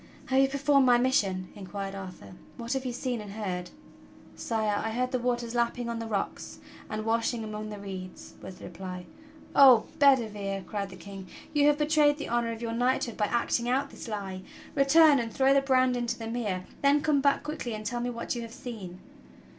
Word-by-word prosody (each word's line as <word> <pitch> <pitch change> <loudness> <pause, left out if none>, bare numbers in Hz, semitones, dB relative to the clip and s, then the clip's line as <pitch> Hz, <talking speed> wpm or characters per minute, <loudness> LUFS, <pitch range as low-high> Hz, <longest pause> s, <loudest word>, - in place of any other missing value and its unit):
"Have 265 0 +3
you 270 - +5
performed 280 -1 +3
my 245 -1 +6
mission?" 200 -8 +1
inquired 195 0 -6
Arthur. 190 -2 -9 0.2
"What 235 +1 -3
have 265 0 -2
you 250 - -1
seen 245 -1 -3
and 205 -1 -9
heard?" 180 -4 -4 0.7
"Sire, 215 -3 -1
I 225 - -1
heard 250 +3 -1
the 255 - 0
waters 240 -1 -1
lapping 235 0 0
on 230 -1 -3
the 230 - -4
rocks 205 -3 -3 0.3
and 215 0 -4
washing 230 +1 0
among 215 0 -5
the 210 - -6
reeds," 190 -2 -8
was 185 - -9
the - - -10
reply. 180 0 -7 0.5
"Oh 260 -5 +8
Bedivere!" 210 -8 +2
cried 200 -2 -4
the 185 - -10
King. 190 +1 -10 0.3
"You 290 -1 +4
have 295 0 +4
betrayed 300 -1 +3
the 295 - -5
honor 235 0 0
of 230 +1 -6
your 230 -1 -2
knighthood 245 -1 0
by 210 - +1
acting 235 +1 0
out 275 +3 0
this - - -9
lie! 195 -4 -5 0.3
Return 290 +1 +6
and 230 -1 -3
throw 270 +4 +3
the 275 - +4
brand 255 -2 +3
into 240 -1 -2
the 225 - -6
mere, 215 -6 -3 0.2
then 285 +1 +4
come 295 -2 +2
back 280 0 +2
quickly 275 -6 -4
and 215 0 -7
tell 240 +3 -2
me 245 - -1
what 235 -1 -3
you 240 - -4
have 230 0 -8
seen." 195 -9 -8
235 Hz, 205 wpm, -28 LUFS, 205-260 Hz, 0.7 s, Oh